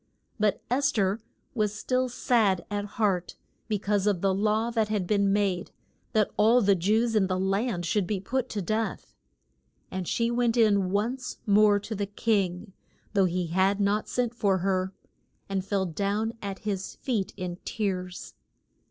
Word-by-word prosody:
But 210 Hz, -1 st, +1 dB
Es 275 Hz, +2 st, +3 dB
ther 200 Hz, -2 st, +1 dB, 0.3 s
was 210 Hz, -3 st, 0 dB
still 255 Hz, +2 st, 0 dB
sad 220 Hz, -7 st, +2 dB
at 205 Hz, 0 st, -1 dB
heart 195 Hz, -5 st, 0 dB, 0.3 s
be 215 Hz, -2 st, 0 dB
cause 205 Hz, 0 st, 0 dB
of 195 Hz, -4 st, +1 dB
the 195 Hz, -1 st, +2 dB
law 215 Hz, +4 st, +1 dB
that 220 Hz, -2 st, +1 dB
had 210 Hz, -4 st, 0 dB
been 200 Hz, +1 st, +2 dB
made, 195 Hz, -3 st, 0 dB, 0.4 s
that 215 Hz, -2 st, +2 dB
all 225 Hz, +4 st, +5 dB
the 200 Hz, -4 st, +4 dB
Jews 220 Hz, +6 st, +1 dB
in 200 Hz, -3 st, +3 dB
the 185 Hz, 0 st, -1 dB
land 195 Hz, -1 st, 0 dB
should 185 Hz, +2 st, 0 dB
be 205 Hz, -1 st, -1 dB
put 255 Hz, +6 st, -2 dB
to 205 Hz, -3 st, -3 dB
death. 215 Hz, +2 st, -2 dB, 0.8 s
And 185 Hz, -2 st, -4 dB
she 235 Hz, 0 st, +1 dB
went 240 Hz, -1 st, +1 dB
in 200 Hz, -5 st, +4 dB
once 235 Hz, +6 st, -2 dB
more 205 Hz, -1 st, +5 dB
to 220 Hz, -, -5 dB
the 200 Hz, -1 st, -2 dB
king 200 Hz, -2 st, -1 dB, 0.4 s
though 195 Hz, -2 st, +4 dB
he 180 Hz, 0 st, 0 dB
had 190 Hz, +2 st, +3 dB
not 205 Hz, +1 st, +1 dB
sent 245 Hz, -2 st, 0 dB
for 200 Hz, -5 st, +2 dB
her 190 Hz, -1 st, +1 dB, 0.6 s
and 195 Hz, -1 st, -2 dB
fell 195 Hz, 0 st, 0 dB
down 200 Hz, +6 st, -1 dB
at 195 Hz, -2 st, -4 dB
his 195 Hz, -2 st, -3 dB
feet 225 Hz, -8 st, -2 dB
in 180 Hz, -2 st, -4 dB
tears. 185 Hz, -4 st, -3 dB
205 Hz, 170 wpm, -27 LUFS, 190-220 Hz, 0.8 s, all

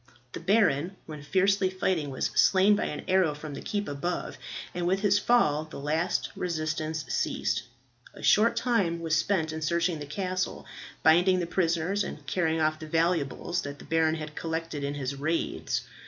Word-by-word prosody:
The -, -, -6 dB
baron, 185 Hz, -3 st, +2 dB
when 155 Hz, -2 st, -8 dB
fiercely 190 Hz, +5 st, +2 dB
fighting, 185 Hz, -5 st, -1 dB
was 130 Hz, -, -2 dB
slain 195 Hz, +2 st, +5 dB
by 205 Hz, -, -1 dB
an 150 Hz, -, -4 dB
arrow 185 Hz, -5 st, +3 dB
from 150 Hz, 0 st, -7 dB
the -, -, -6 dB
keep 205 Hz, -1 st, -2 dB
above, 145 Hz, +5 st, -3 dB, 0.4 s
and 175 Hz, 0 st, -2 dB
with 190 Hz, +2 st, +1 dB
his 205 Hz, -1 st, +4 dB
fall 155 Hz, -11 st, +3 dB
the 155 Hz, -, -9 dB
last 160 Hz, +5 st, -1 dB
resistance 155 Hz, -2 st, -2 dB
ceased. 120 Hz, -, 0 dB, 0.5 s
A -, -, -11 dB
short 230 Hz, +3 st, +5 dB
time 225 Hz, -9 st, +1 dB
was 160 Hz, -1 st, +1 dB
spent 160 Hz, -2 st, +1 dB
in 160 Hz, -, -5 dB
searching 170 Hz, +1 st, 0 dB
the 145 Hz, -, -7 dB
castle, 185 Hz, +3 st, -3 dB, 0.4 s
binding 175 Hz, +4 st, +5 dB
the 175 Hz, -, 0 dB
prisoners, 170 Hz, +3 st, 0 dB
and 150 Hz, -5 st, -7 dB
carrying 160 Hz, +1 st, 0 dB
off 155 Hz, 0 st, +1 dB
the 155 Hz, -, -8 dB
valuables 165 Hz, +1 st, 0 dB
that 145 Hz, -1 st, -6 dB
the -, -, -13 dB
baron 160 Hz, -1 st, +2 dB
had 155 Hz, -1 st, -6 dB
collected 160 Hz, -2 st, -4 dB
in 140 Hz, +1 st, -2 dB
his 135 Hz, -1 st, -3 dB
raids. 155 Hz, +4 st, -2 dB
165 Hz, 175 wpm, -28 LUFS, 155-185 Hz, 0.5 s, slain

